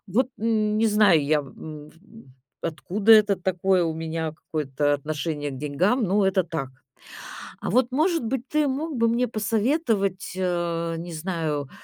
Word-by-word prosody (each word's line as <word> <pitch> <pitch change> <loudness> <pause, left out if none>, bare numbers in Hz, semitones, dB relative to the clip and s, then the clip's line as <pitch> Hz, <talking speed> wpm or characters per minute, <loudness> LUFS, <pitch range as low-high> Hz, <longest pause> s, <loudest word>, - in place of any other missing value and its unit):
Вот 245 +7 +1
н 215 -2 +1
не 225 - +3
знаю 205 -7 +4
я, 150 +1 +2
м, 150 +2 -10
в - - -23 0.7
откуда 200 +7 +2
это 210 -2 +6
такое 185 0 +1
у 160 - -2
меня 160 -1 -3
какое-то 145 -2 -1
отношение 150 0 -3
к 135 - -7
деньгам, 160 - +1
но 195 +1 +2
это 190 -1 +2
так. 155 -6 -4 0.9
А - - -3
вот, 250 +2 +2
может 325 -1 +1
быть, 250 +2 -2
ты 305 -1 +2
мог 290 +3 -3
бы 230 0 +3
мне 240 +2 +1
посоветовать, 215 - 0
э, 170 -2 -1
не 170 +1 -7
знаю, 155 -4 -3
185 Hz, 155 wpm, -24 LUFS, 155-225 Hz, 0.9 s, это